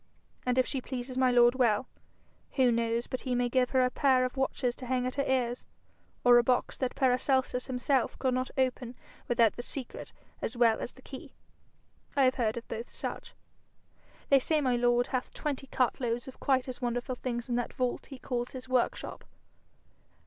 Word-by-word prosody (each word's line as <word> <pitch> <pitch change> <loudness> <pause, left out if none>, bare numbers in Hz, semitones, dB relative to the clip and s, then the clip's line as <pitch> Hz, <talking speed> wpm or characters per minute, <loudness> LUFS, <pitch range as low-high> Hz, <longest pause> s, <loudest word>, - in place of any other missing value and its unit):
And 250 0 +2
if 255 - +4
she 270 - -3
pleases 255 0 -5
my 260 0 +3
lord 240 -1 +6
well, 245 -2 +2 0.7
who 255 -3 +4
knows 230 0 0
but 255 - -4
he 255 -2 -1
may 245 0 +1
give 250 0 +2
her 260 -1 +3
a 250 - 0
pair 260 -2 +3
of 255 - -4
watches 265 -2 0
to 255 - -8
hang 250 0 0
at 255 - -2
her 280 -1 -1
ears, 250 -2 0 0.6
or 245 -1 +7
a - - +3
box 250 +1 +1
that 255 -2 -1
Paracelsus 260 -1 +1
himself 260 0 0
could 260 -1 0
not 255 +1 -1
open 255 -2 -1 0.3
without 235 -2 +4
the - - -3
secret 255 0 -5 0.3
as 235 - -3
well 230 -2 +4
as - - -5
the 260 - -18
key? 265 - -10 0.8
I 275 - +5
have 255 0 +4
heard 220 0 +1
of 235 - -7
both 230 +2 -5
such. - - -6 0.9
They 275 - +7
say 310 +4 +1
my 255 -4 +1
lord 240 0 +3
hath 255 -1 -3
twenty 280 -2 -3
cartloads 240 -2 0
of 265 - -10
quite 260 -2 +1
as 255 0 -6
wonderful 245 +1 -2
things 240 -1 -4
in 245 - -2
that 245 - -2
vault 250 -2 -2
he 270 - -9
calls 245 -1 -3
his 255 -1 -8
workshop. 255 -1 -1
250 Hz, 190 wpm, -30 LUFS, 240-260 Hz, 0.9 s, or